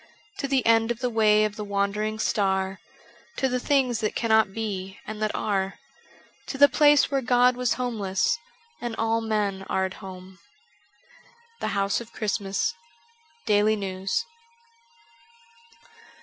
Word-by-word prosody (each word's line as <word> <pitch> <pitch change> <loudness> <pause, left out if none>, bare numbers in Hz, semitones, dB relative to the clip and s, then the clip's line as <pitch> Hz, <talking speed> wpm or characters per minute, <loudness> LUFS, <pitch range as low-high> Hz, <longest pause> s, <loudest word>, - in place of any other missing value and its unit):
To 275 - -1
the 265 -2 +1
end 225 0 +4
of 240 - -1
the 250 -1 -1
way 215 -1 +4
of 210 0 -4
the 210 - -4
wandering 205 +2 -1
star, 190 -3 0 0.6
To 265 - +1
the 250 -1 -1
things 255 -4 +1
that 215 -2 -2
cannot 220 -3 +3
be 195 -3 -4
and 215 0 -7
that 215 - +1
are, 195 -2 -1 0.7
To 270 - -5
the 285 +1 +8
place 290 +1 +4
where 275 -1 +1
God 250 0 +4
was 250 -1 +1
homeless 225 - -1 0.4
And 240 -2 -4
all 225 +1 0
men 210 -3 -1
are 190 - +1
at 190 - -5
home. 185 0 -10 1.2
The - - -2
House 200 +3 +1
of 235 0 -12
Christmas: 200 -2 -1 0.4
' 465 0 -34
Daily 210 +1 +3
News.'' 190 - -2
215 Hz, 145 wpm, -25 LUFS, 200-245 Hz, 1.2 s, the